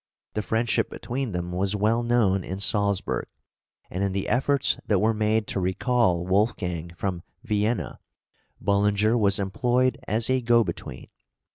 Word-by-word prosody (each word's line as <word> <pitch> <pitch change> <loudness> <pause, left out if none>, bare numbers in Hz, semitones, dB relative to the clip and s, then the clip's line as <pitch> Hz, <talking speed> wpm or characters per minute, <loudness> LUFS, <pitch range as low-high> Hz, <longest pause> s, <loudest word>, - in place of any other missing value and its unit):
The 105 - -1
friendship 110 +3 0
between 130 -1 -4
them 90 -1 -4
was 95 +3 0
well 110 +3 +1
known 115 -6 +2
in 95 - -5
Salzburg; 100 -1 +1 0.6
and 95 +2 -3
in 100 -1 -1
the 95 0 -2
efforts 135 +2 +2
that 105 - +3
were 110 +4 +2
made 110 0 +1
to - - 0
recall 95 -1 +1
Wolfgang 90 -4 0
from 90 -1 -3 0.2
Vienna 110 -1 -1 0.6
Bullinger 105 +3 +2
was 100 -4 +3
employed 125 +6 0
as 110 +2 +2
a 130 0 +1
go 120 0 +4
between. 85 - -6
105 Hz, 145 wpm, -25 LUFS, 95-115 Hz, 0.6 s, go